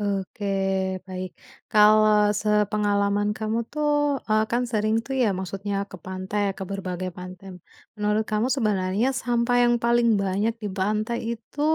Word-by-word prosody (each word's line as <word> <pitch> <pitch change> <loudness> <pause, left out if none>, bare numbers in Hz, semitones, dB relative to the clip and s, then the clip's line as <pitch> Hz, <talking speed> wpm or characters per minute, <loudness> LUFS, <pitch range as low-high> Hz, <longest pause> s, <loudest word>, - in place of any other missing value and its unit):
Oke, 200 0 -3 0.6
baik, 185 0 -5 0.4
kalau 210 -1 +5
sepengalaman 205 -1 +1
kamu 220 +1 -1
tuh, 300 0 0 0.4
eee, 215 0 +3
kan 240 +2 +1
sering 215 0 +1
tuh 270 - -4
ya 225 - +3
maksudnya 195 +2 -4 0.2
ke 190 - -8
pantai 190 +2 -3 0.2
ke 190 - -4
berbagai 185 -2 -4
pantai, 185 0 -9 0.4
menurut 210 +1 +1
kamu 215 +4 +1
sebenernya 205 0 +1
sampah 245 -1 0
yang 240 0 +4
paling 235 0 +3
banyak 200 +4 0
di 205 - -2
pantai 215 +4 0 0.2
itu, 230 +6 -12
210 Hz, 140 wpm, -24 LUFS, 195-225 Hz, 0.6 s, kalau